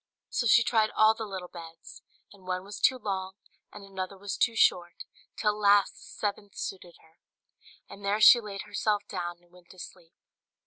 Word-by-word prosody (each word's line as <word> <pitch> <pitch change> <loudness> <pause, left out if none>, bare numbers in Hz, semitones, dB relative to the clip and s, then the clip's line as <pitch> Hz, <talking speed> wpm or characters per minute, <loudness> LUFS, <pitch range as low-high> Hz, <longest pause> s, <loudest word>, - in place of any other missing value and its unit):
So 240 - 0
she 235 +2 +6
tried 220 -2 +2
all 215 0 +5
the 220 0 -6
little 190 -2 -7
beds; 165 -2 -12 0.3
and 190 -2 -19
one 185 0 -2
was 200 +1 -9
too 260 - +3
long, 190 -4 -4 0.4
and 205 - -11
another 195 0 -6
was 200 0 -5
too 230 - +1
short, 175 -5 +1 0.3
till 210 - +1
at 210 - -8
last 200 -1 +4
the - - -18
seventh 205 -1 -5
suited 180 -3 -7
her; 160 0 -26 0.7
and 200 - -13
there 200 +2 0
she 240 +2 +8
laid 200 -2 -7
herself 210 0 -1
down 175 0 -5
and 175 - -29
went 180 -1 -21
to 185 - -16
sleep. 170 -1 -12
200 Hz, 190 wpm, -28 LUFS, 180-210 Hz, 0.7 s, she